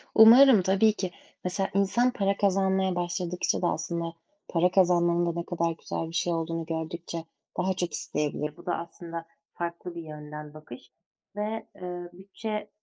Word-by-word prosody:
Umarım, 230 0 +9
tabii 195 +4 +4
ki. 185 -4 -3 0.3
Mesela 190 +2 -1
insan 200 +6 +3
para 200 -3 0
kazanmaya 190 -1 +2
başladıkça 175 +1 -1
da 175 - +2
aslında 170 -1 -2 0.3
para 175 +1 +2
kazanmanın 175 -2 +4
da 170 0 -1
ne 170 - -4
kadar 170 -2 0
güzel 165 0 -4
bir 165 - -10
şey 175 +1 +1
olduğunu 165 0 -2
gördükçe 165 +1 -4 0.3
daha 190 +1 +1
çok 180 -2 -2
isteyebilir. 150 0 -2
Bu - - -14
da 175 - 0
aslında 170 0 -7 0.3
farklı 170 0 -5
bir 170 - -5
yönden 150 -1 -8
bakış 125 -5 -12 0.4
ve, 215 +1 -3
eee, 180 -1 -6
bütçe 210 +3 -5
175 Hz, 155 wpm, -28 LUFS, 165-195 Hz, 0.4 s, Umarım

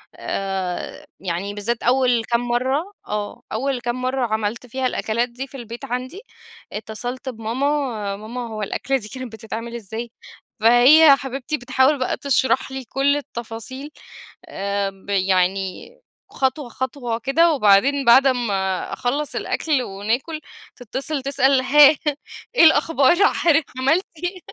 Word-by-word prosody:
آآ 190 -2 -4
يعني 190 +2 -3
بالذات 220 +3 -2
أول 245 -2 +3
كام 235 +1 0
مرّة، 265 +10 -1
آه 210 -1 -4
أول 260 +3 -1
كام 245 +1 -3
مرّة 255 0 0
عملت 220 +2 -2
فيها 260 +2 -1
الأكلات 235 0 -1
دي 255 +3 -7
في 275 - -11
البيت 235 -1 -8
عندي، 255 - -5 0.5
اتّصلت 245 +5 -5
بماما، 235 +3 -2 0.5
"ماما 235 +4 -6
هو 215 -1 -6
الأكلة 270 +6 -1
دي 215 -5 -7
كانت 255 -2 -7
بتتعمل 225 +1 -6
إزاي؟" 230 +1 -6 0.5
فهيّ 260 +7 +7
حبيبتي 270 +2 -4
بتحاول 260 +3 +2
بقى 255 - -1
تشرح 265 -1 +1
لي 265 0 -5
كل 275 +5 +1
التفاصيل، 260 +1 -6 0.5
آآ 200 0 -2
ب 195 +1 -17
يعني 190 -1 0 0.4
خطوة، 265 0 -1
خطوة 245 -2 -3
كده، 320 +7 +3
وبعدين 265 +3 +3
بعد 260 +3 +7
أمّا 200 -7 -1
أخلّص 275 +4 -2
الأكل 300 -5 0
وناكُل، 235 +11 -3 0.3
تتّصل 270 +4 -4
تسأل 275 -1 +3
هاه 290 +3 +7 0.6
إيه 485 - +6
الأخبار 320 -1 +5 0.2
حضرتِك 320 -3 +3
عملتِ 315 +9 +2 0.2
إيه؟ 360 +1 -3
245 Hz, 130 wpm, -21 LUFS, 220-275 Hz, 0.6 s, فهيّ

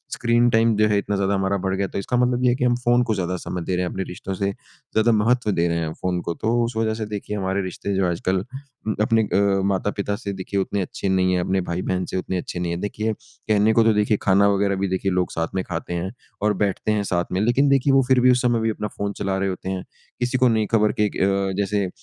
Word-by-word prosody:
Screen 120 0 +3
time 115 -1 +3
जो 110 0 +4
है 105 -1 +2
इतना 100 0 -1
ज़्यादा 100 0 +1
हमारा 95 +1 0
बढ़ 95 0 -1
गया 100 0 0
है - - -6
तो - - -4
इसका 125 +5 -1
मतलब 125 0 +1
ये 125 - +5
है 120 - +2
कि 125 - -2
हम 120 -1 +3
फ़ोन 120 +1 +4
को 110 -3 0
ज़्यादा 90 -1 -2
समय 90 0 -5
दे 90 - -1
रहे 90 0 0
हैं - - -2
अपने 95 - -3
रिश्तों 95 +2 -6
से 100 +1 -1
ज़्यादा 110 +3 -2
महत्व 110 +1 +2
दे 85 -2 +1
रहे 85 0 0
हैं 80 -1 -2
फ़ोन 90 -1 0
को। 85 - -3
तो 110 +6 -1
उस 115 -1 -3
वजह 110 -1 +1
से 110 -1 -4
देखिए 105 0 -5
हमारे 95 0 -1
रिश्ते 95 +1 -4
जो 95 -1 +2
आजकल 95 +2 -1 0.6
अपने 115 +1 +3
अ, 100 -1 +2
माता-पिता 100 +1 -1
से 100 -1 -5
देखिए 95 +1 -3
उतने 100 +1 -1
अच्छे 95 +2 -3
नहीं 95 -1 +2
हैं 90 - +1
अपने 95 +1 0
भाई-बहन 90 +1 -2
से - - -4
उतने 95 0 -2
अच्छे 90 0 -5
नहीं 85 -1 -2
हैं। 85 - -3
देखिए 110 +2 -2
कहने 110 +1 0
को 115 - +5
तो 110 -1 +4
देखिए 105 0 +2
खाना 100 +1 +4
वगैरह 100 0 +1
भी 95 +1 -1
देखिए 95 +1 -1
लोग 90 0 0
साथ 80 0 -1
में 95 - 0
खाते 85 0 -5
हैं 90 +3 -3 0.3
और 105 0 +2
बैठते 100 +2 -1
हैं 105 -1 +1
साथ 85 -3 0
में 95 +2 0
लेकिन 130 +5 +3
देखिए 135 0 +3
वो 135 - +6
फ़िर 130 -1 +4
भी 125 0 +6
उस 125 - +2
समय 120 -2 +2
भी 115 - +1
अपना 105 -1 -3
फ़ोन 100 0 -2
चला 95 -1 -1
रहे 95 0 0
होते 95 0 -5
हैं। 95 -1 -3 0.4
किसी 125 +1 0
को 130 0 +4
नहीं 110 -2 +2
खबर 105 -1 +3
कि 105 - +4
एक - - -3
अ, 95 0 +1
जैसे 100 -1 0
100 Hz, 270 wpm, -22 LUFS, 95-110 Hz, 0.6 s, वो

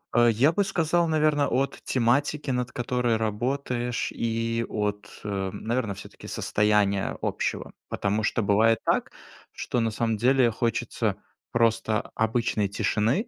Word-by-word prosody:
А, 120 0 +6
я 120 +7 +4
бы 200 +5 +1
сказал, 175 -4 +1
наверно, 155 -2 +2
от 135 +3 -1
тематики, 135 +4 +1
над 125 -1 -1
которой 120 -1 0
работаешь, 120 +2 -2
и 115 0 -1
от, 105 -1 -2
а, 100 -2 -2
наверно, 115 -2 -2
всё-таки 100 - -11
состояния 105 -2 +1
общего. - - -2 0.2
Потому 105 +2 0
что 110 +1 0
бывает 110 +3 +4
так, - - +1 0.4
что 125 - -2
на 115 -1 +1
самом 110 0 -1
деле 125 +1 +4
хочется 115 -2 -1 0.4
просто 115 -2 +1
обычной 110 -2 0
тишины. 110 - 0
115 Hz, 130 wpm, -26 LUFS, 110-130 Hz, 0.4 s, А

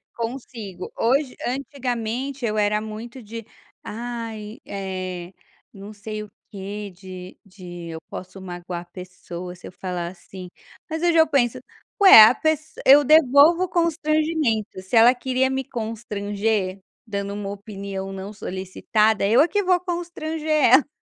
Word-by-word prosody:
Consigo. 230 -6 -6
Hoje 260 +3 +1
antigamente 255 0 -3
eu 215 -1 -1
era 210 0 +2
muito 230 +4 -8
de: 225 +1 -8 0.4
"Ai, 225 -1 -6
eh, 185 -2 -5 0.4
não 200 +2 -10
sei 215 +1 -6
o 205 - -13 0.2
quê, 205 +1 -6
de 185 0 -10
de 175 -3 -10
eu 160 0 -6
posso 185 +1 -8
magoar 175 -1 -6
a - - -13
pessoa 180 0 -9
se 180 - -12
eu - - -10
falar 180 -2 -4
assim." 185 0 -10 0.4
Mas 320 +1 -3
hoje 340 -1 +3
eu 320 - +6
penso: 255 -2 +1 0.4
"Ué, 300 - +11
a 225 - +7
pess 315 +2 -1
eu 285 +2 +8
devolvo 310 +4 +6
constrangimento." 310 - 0
Se 190 +5 -4
ela 230 +2 +8
queria 260 +1 0
me 265 0 -1
constranger, 210 -4 -3 0.2
dando 200 -2 -4
uma 205 -1 -5
opinião 195 -1 -6
não 195 +2 -7
solicitada, 205 +3 0
eu 225 +4 +4
é 315 - +4
que 410 +2 0
vou 365 -1 +3
constranger 340 -3 -4
ela. 285 -3 +5
220 Hz, 145 wpm, -23 LUFS, 195-265 Hz, 0.4 s, Ué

